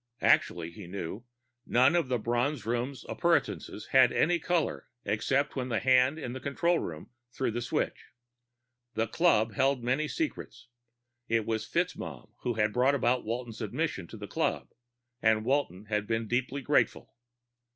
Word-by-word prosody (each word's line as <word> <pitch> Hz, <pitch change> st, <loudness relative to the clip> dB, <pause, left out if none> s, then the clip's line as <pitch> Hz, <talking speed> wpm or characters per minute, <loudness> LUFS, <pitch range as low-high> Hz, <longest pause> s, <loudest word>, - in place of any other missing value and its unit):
Actually, 85 Hz, -1 st, +3 dB
he 90 Hz, +1 st, -10 dB
knew, 100 Hz, +5 st, -6 dB, 0.4 s
none 130 Hz, +7 st, +4 dB
of 170 Hz, -5 st, +2 dB
the 125 Hz, -1 st, +1 dB
Bronze 120 Hz, +6 st, -1 dB
Room's 120 Hz, +3 st, -2 dB
appurtenances 105 Hz, -, 0 dB
had 130 Hz, -2 st, +6 dB
any 175 Hz, +1 st, +2 dB
color 175 Hz, -3 st, -1 dB, 0.2 s
except 130 Hz, +7 st, 0 dB
when 130 Hz, -2 st, -2 dB
the 115 Hz, -, +1 dB
hand 130 Hz, +3 st, +4 dB
in 125 Hz, -6 st, -5 dB
the 130 Hz, -, -5 dB
control 170 Hz, +5 st, +1 dB
room 80 Hz, +4 st, -6 dB, 0.2 s
threw 130 Hz, -, -1 dB
the 120 Hz, +2 st, -3 dB
switch. 120 Hz, -, -2 dB, 0.9 s
The 110 Hz, -, +1 dB
club 115 Hz, -, +2 dB
held 135 Hz, +1 st, +1 dB
many 130 Hz, +6 st, +1 dB
secrets. 145 Hz, -, -4 dB, 0.6 s
It 115 Hz, -1 st, +1 dB
was 110 Hz, -1 st, -2 dB
FitzMaugham -, -, -3 dB
who 120 Hz, -2 st, -2 dB
had 105 Hz, -1 st, +1 dB
brought 130 Hz, +3 st, +3 dB
about 125 Hz, -3 st, +1 dB
Walton's 115 Hz, 0 st, -4 dB
admission 110 Hz, -, -2 dB
to -, -, -10 dB
the -, -, -7 dB
club, -, -, -1 dB, 0.5 s
and 110 Hz, -1 st, +3 dB
Walton 125 Hz, -8 st, 0 dB
had 105 Hz, -1 st, -1 dB
been 115 Hz, 0 st, -1 dB
deeply 130 Hz, +4 st, -1 dB
grateful. -, -, +1 dB
120 Hz, 155 wpm, -30 LUFS, 110-135 Hz, 0.9 s, had